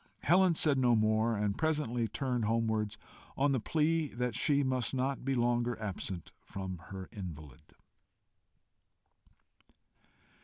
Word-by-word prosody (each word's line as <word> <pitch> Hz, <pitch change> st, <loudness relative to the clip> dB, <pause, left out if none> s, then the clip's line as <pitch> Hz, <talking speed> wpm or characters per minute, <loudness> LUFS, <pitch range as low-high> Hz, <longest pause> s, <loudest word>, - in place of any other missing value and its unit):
Helen 180 Hz, +1 st, +4 dB
said 145 Hz, -4 st, +3 dB
no 120 Hz, -2 st, +4 dB
more, 110 Hz, +1 st, +2 dB
and 105 Hz, -1 st, 0 dB
presently 145 Hz, -7 st, 0 dB
turned 125 Hz, -2 st, -1 dB
homewards, 110 Hz, -1 st, 0 dB, 0.4 s
on 140 Hz, +1 st, +3 dB
the 130 Hz, -, +2 dB
plea 160 Hz, +5 st, +1 dB
that 125 Hz, -1 st, -1 dB
she 140 Hz, +5 st, +2 dB
must 130 Hz, -1 st, -1 dB
not 130 Hz, +1 st, -1 dB
be 135 Hz, +1 st, 0 dB
longer 120 Hz, 0 st, +1 dB
absent 95 Hz, -4 st, -5 dB
from 95 Hz, -2 st, -6 dB
her 95 Hz, -1 st, -7 dB
invalid. 75 Hz, -9 st, -9 dB
120 Hz, 120 wpm, -32 LUFS, 105-135 Hz, 0.4 s, Helen